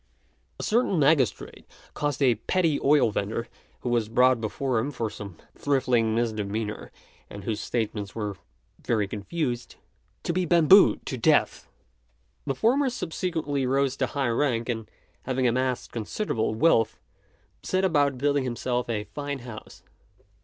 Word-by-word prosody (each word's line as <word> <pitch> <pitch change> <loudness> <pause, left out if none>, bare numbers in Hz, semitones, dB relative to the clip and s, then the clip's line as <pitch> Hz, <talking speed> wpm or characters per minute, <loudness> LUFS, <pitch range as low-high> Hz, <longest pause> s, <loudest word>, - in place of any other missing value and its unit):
A - - -4
certain 225 -4 +2
magistrate 140 -5 +1 0.3
caused 145 -1 -1
a 125 -3 +5
petty 160 - 0
oil 140 -5 +4
vendor, 110 +3 -2 0.3
who 125 - -3
was 115 -3 +1
brought 125 +1 +4
before 120 +2 -1
him 125 +6 -1
for 115 -6 -3
some 100 -5 -9 0.2
trifling 125 -5 +1
misdemeanour, 110 -2 -2 0.4
and 100 -1 -9
whose 105 0 -2
statements 105 -5 -3
were 105 -3 -3 0.5
very 110 -4 +1
confused, 120 - -4 0.5
to 170 - -1
be 185 +1 +1
bambooed 175 +3 +5
to 130 - -4
death. 150 +5 +2 0.8
The 135 - 0
former 260 - +2
subsequently 160 - -2
rose 135 0 +1
to 130 - 0
high 140 -2 -1
rank; 120 -1 0
and 115 -2 -3 0.4
having 130 -1 +1
amassed 125 +1 -1
considerable 110 - -2
wealth, 115 -4 +3 0.6
set 185 +1 0
about 145 -6 +2
building 140 +1 +1
himself 125 0 -2
a 105 -2 -1
fine 145 +4 -5
house. 115 -3 -10
125 Hz, 140 wpm, -26 LUFS, 115-145 Hz, 0.8 s, a